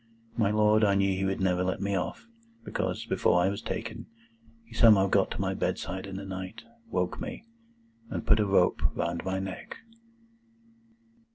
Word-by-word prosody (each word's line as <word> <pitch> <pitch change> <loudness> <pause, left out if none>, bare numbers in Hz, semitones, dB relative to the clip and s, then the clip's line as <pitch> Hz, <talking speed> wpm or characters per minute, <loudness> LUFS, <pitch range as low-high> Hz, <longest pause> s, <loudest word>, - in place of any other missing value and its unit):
My 110 -4 +2
Lord, 105 +1 +4
I 100 -2 +4
knew 100 -1 +2
he 95 +1 -1
would 95 0 -1
never 90 -1 +1
let 95 0 -1
me 100 0 -1
off, 90 - -3 0.4
because, - - -2
before 90 - +2
I 90 - +3
was 100 - -4
taken, - - -5 0.6
he 115 - -16
somehow 110 -4 +6
got 95 - +2
to - - -5
my - - 0
bedside 95 +1 -3
in 95 - -7
the 100 +1 -6
night, 95 +3 -6 0.3
woke 90 -1 -1
me, - - -6 0.7
and - - -4
put 110 - +4
a 105 - +2
rope 95 -2 +3
round 85 0 -2
my 95 0 -2
neck." 95 -1 -6
95 Hz, 175 wpm, -28 LUFS, 95-105 Hz, 0.7 s, somehow